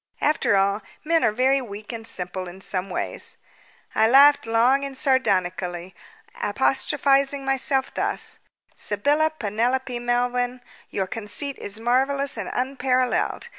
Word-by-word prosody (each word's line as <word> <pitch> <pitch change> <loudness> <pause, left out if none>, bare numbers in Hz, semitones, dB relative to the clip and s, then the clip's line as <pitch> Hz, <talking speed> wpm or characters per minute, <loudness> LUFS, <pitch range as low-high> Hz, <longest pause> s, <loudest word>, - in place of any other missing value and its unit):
After 300 -8 +2
all, 200 +2 +1 0.2
men 330 +1 +2
are - - +4
very 260 +4 +2
weak 210 -1 -8
and 225 -1 -7
simple 180 0 -5
in 175 +2 -10
some 190 0 -2
ways. - - -3 0.6
I 220 0 +3
laughed 280 0 +6
long 240 +5 +3
and 275 -1 -4
sardonically, 185 -9 0 0.5
apostrophizing 275 +4 +1
myself 270 0 0
thus: - - -2 0.3
"Sybylla 290 +10 +1
Penelope 240 +3 -1
Melvyn, 245 +1 -1 0.3
your 190 - -2
conceit 225 +8 -3
is 205 +2 -4
marvellous 270 +4 +1
and - - -5
unparalleled! 255 - 0
245 Hz, 125 wpm, -24 LUFS, 205-270 Hz, 0.6 s, laughed